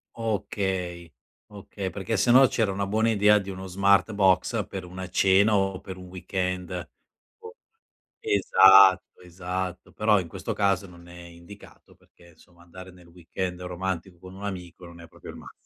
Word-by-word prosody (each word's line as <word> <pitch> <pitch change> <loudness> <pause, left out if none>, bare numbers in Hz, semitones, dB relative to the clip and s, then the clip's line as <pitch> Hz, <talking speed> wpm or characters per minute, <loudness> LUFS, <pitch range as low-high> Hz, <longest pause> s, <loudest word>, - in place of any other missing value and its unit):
Okay 95 -6 -3 0.4
okay, 100 -1 -7
perché 100 +4 -4
sennò 125 +6 +5
c'era 110 -4 -1
una 100 +1 -2
buona 110 +3 +1
idea 105 -1 +4
di 100 -1 -8
uno 95 0 -7
Smartbox 100 0 +1
per 95 -1 -7
una 90 +1 -8
cena 100 +3 +3
o 95 -1 -1
per 95 -1 -9
un 90 - -11
weekend. 90 -1 -5 0.5
O 450 +1 -12 0.6
esatto 95 - +5
esatto, 90 0 -6
però 105 -1 +2
in 85 - -9
questo - - -5
caso 100 -1 0
non 85 -1 -16
è 90 0 -12
indicato 85 +4 -15
perché, 85 - -23
insomma, 85 +1 -22
andare 95 +1 -13
nel 90 -1 -19
weekend 90 +1 -6
romantico 90 0 -5
con 90 +1 -13
un 100 - -11
amico 90 -3 -8
non 85 0 -13
è 85 - -13
proprio - - -12
il - - -12
massi - - -13
95 Hz, 160 wpm, -25 LUFS, 90-100 Hz, 0.6 s, sennò